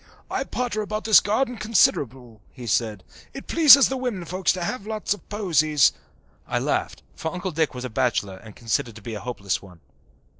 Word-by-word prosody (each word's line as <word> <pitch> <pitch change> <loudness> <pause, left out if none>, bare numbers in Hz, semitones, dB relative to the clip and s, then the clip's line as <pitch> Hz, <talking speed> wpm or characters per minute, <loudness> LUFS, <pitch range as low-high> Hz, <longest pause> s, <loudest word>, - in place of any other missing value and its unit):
"I - - -2
potter 235 -4 -3
about 215 +1 -4
this 220 -1 +7
garden 240 +4 -1
considerable," 130 - 0
he 125 -3 -10
said. 110 -3 -1 0.3
"It 270 - -8
pleases 285 -4 +7
the 265 - -3
women 240 -9 -4
folks 185 +1 0
to 180 -2 -4
have 210 +3 -4
lots 215 -2 -1
of 205 - -15
posies." 155 - +2 0.5
I - - -1
laughed, - - -2
for 160 - -5
Uncle 180 +2 -4
Dick 155 -3 -1
was 125 0 -5
a - - -4
bachelor 105 -5 -1
and 110 0 -14
considered 115 -1 -2
to 110 - -12
be 115 - -6
a 105 - -5
hopeless 100 -5 -3
one. 90 -3 -15
165 Hz, 190 wpm, -23 LUFS, -, 0.5 s, this